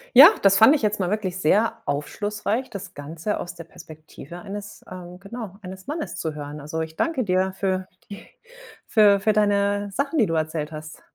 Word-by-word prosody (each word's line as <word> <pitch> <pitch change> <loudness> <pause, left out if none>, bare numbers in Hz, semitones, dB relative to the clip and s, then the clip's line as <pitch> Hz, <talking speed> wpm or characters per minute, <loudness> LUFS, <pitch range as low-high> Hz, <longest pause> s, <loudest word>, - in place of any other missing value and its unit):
Ja. - - +12
Das 195 0 +6
fand 225 +9 +7
ich 290 - -1
jetzt 210 -1 0
mal 180 -1 0
wirklich 195 -4 -2
sehr 205 +7 +2
aufschlussreich, 205 - -2
das 195 -1 -8
Ganze 160 +8 -4
aus 175 - -6
der 170 - -9
Perspektive 155 0 -12
eines 205 +1 -8
ähm, 180 0 -9
genau, 200 -1 -8
eines 190 +2 -10
Mannes 305 +1 -4
zu 160 -2 -3
hören. 150 0 -7
Also 155 +3 -4
ich 160 0 -6
danke 325 -6 0
dir 185 -1 +1
für 190 -1 -1 0.2
die 200 - -10 0.6
für 205 -2 +5
für 215 - +3
deine 205 -1 +1
Sachen, 280 +8 -1
die 225 - +5
du 165 - -3
erzählt 155 -1 -2
hast. 155 0 -9
190 Hz, 190 wpm, -24 LUFS, 160-210 Hz, 0.6 s, Ja